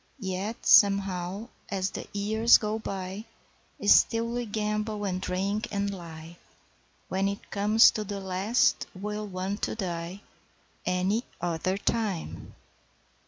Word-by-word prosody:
Yet 195 0 -4
somehow 195 0 +4 0.2
as 195 -1 -1
the - - -6
years 220 +3 +4
go 215 0 -2
by 195 0 -5 0.6
Still 230 +2 +5
we 240 0 -3
gamble 210 0 -2
and 185 -1 -2
drink 195 +3 -1
and 200 0 -1
lie, 165 -2 -10 0.7
When 190 +1 0
it 200 0 -5
comes 210 +3 +6
to 215 - -3
the 200 -1 -5
last 195 +6 +1
we'll 210 +2 -4
want 190 +2 -4
to - - -1
die 180 -2 -4 0.7
Any 185 +5 +1 0.2
other 175 +2 -1
time! 205 -5 -3
200 Hz, 120 wpm, -28 LUFS, 185-215 Hz, 0.7 s, comes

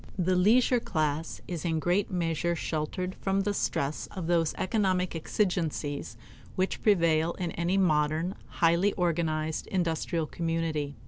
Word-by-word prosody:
The 185 0 +2
leisure 235 +7 +4
class 155 -5 -2
is 175 -3 -4
in 165 -2 0
great 175 +5 +1
measure 170 -1 0
sheltered 170 +4 -3
from 195 +1 0
the 205 +1 0
stress 145 -6 -1
of 185 -4 -6
those 165 -2 +1
economic 185 -3 0
exigencies 160 - -2 0.4
which 185 +1 -1
prevail 170 -5 +3
in 175 -3 -3
any 170 +4 0
modern, 160 0 +2
highly 170 +4 +2
organized 160 -3 -1
industrial 170 -2 -1
community. 165 -3 -2
170 Hz, 130 wpm, -29 LUFS, 160-185 Hz, 0.4 s, leisure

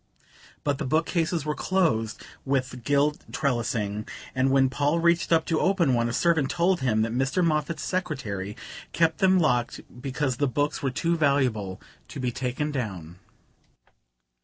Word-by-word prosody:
But 145 -1 0
the 155 - -2
bookcases 165 +2 0
were 150 - 0
closed 150 - 0 0.2
with 130 -2 -2
gilt 145 +3 +1
trellising, 110 -5 -1 0.3
and 130 0 +2
when 135 0 +4
Paul 145 +4 0
reached 170 0 +2
up 160 -1 +4
to 160 - 0
open 180 -8 +2
one, 120 -1 +1
a - - -2
servant 160 +1 +2
told 175 +1 +2
him 110 -5 +1
that 115 - -2
Mr. 135 +8 +1
Moffatt's 155 0 -1
secretary 120 - -3 0.4
kept 165 -1 +2
them 190 -1 +4
locked 125 -7 +1 0.2
because 135 -1 -2
the 145 - +1
books 145 +4 -1
were 135 - 0
too 165 +6 0
valuable 130 - +1 0.3
to - - -8
be 125 -1 -1
taken 130 +5 -2
down. 95 - -5
140 Hz, 155 wpm, -26 LUFS, 120-160 Hz, 0.4 s, when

